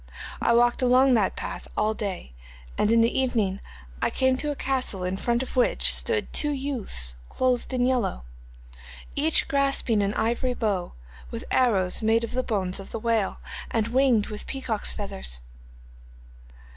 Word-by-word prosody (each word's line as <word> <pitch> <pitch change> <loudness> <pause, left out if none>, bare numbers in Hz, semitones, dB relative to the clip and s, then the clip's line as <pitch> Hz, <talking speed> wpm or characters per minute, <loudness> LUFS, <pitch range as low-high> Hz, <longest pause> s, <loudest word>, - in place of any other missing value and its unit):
I 235 - +3
walked 240 +2 +3
along 255 +1 +5
that 215 -5 +2
path - - -6
all 215 +1 +2
the - - -15
day, 185 - -5 0.4
and 210 - +1
in 230 0 +5
the 230 +3 +2
evening 220 -7 0 0.4
I - - +2
came 260 0 +2
to 295 - -1
a 290 - -2
castle 255 -9 -1
in 180 +1 -1
front 235 +5 0
of 260 - -9
which 250 - +4
stood 455 -2 -1
two 295 - +2
youths 260 - -2 0.2
clothed 255 -1 0
in 250 -1 +1
yellow, 245 - 0 0.9
each 305 +2 +2
grasping 275 -6 +1
an 200 +1 -1
ivory 240 +2 0
bow, 200 -7 -1 0.4
with - - -6
arrows 200 -8 +2
made 225 +1 +3
of 230 - -4
the 255 - 0
bones 195 -6 -1
of 195 - -9
the - - -4
whale, 225 -3 0 0.3
and 225 -1 0
winged 250 -4 +3
with 210 -1 -8
peacock's 240 -6 -1
feathers. 65 - -5
230 Hz, 165 wpm, -25 LUFS, 205-260 Hz, 0.9 s, along